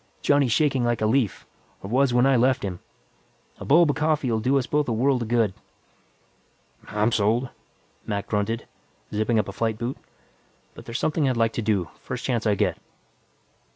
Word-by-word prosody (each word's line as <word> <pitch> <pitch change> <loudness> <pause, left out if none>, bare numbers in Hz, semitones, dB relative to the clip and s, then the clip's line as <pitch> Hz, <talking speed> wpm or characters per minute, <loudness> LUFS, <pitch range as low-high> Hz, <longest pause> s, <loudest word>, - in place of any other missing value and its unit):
Johnny's 145 -4 +3
shaking 135 -2 +2
like 120 -1 0
a 110 - 0
leaf, 110 -1 0 0.4
or - - -5
was 135 +1 +3
when 120 +1 +3
I 135 0 +4
left 125 0 +2
him. 90 -3 -4 0.8
A - - -7
bulb 160 +1 +5
of - - -6
coffee 155 -5 +1
will 110 - +1
do 130 +5 +2
us 130 - 0
both 150 +2 0
a - - -1
world 125 +3 +1
of 115 - -3
good." 115 -4 +1 1.3
"I'm 105 +2 0
sold," 115 +4 +1 0.6
Mac 100 -2 -2
grunted, 110 +2 -2 0.5
zipping 110 +2 +1
up 105 - +1
a - - -4
flight 110 -2 -2
boot. 120 +3 -4 0.8
"But - - -13
there's 115 - -4
something 155 -3 +1
I'd 125 - -1
like 115 -1 +1
to - - -2
do, 100 -7 0
first 125 -1 -6
chance 115 -4 0
I 105 - +3
get." - - 0
120 Hz, 190 wpm, -24 LUFS, 110-135 Hz, 1.3 s, bulb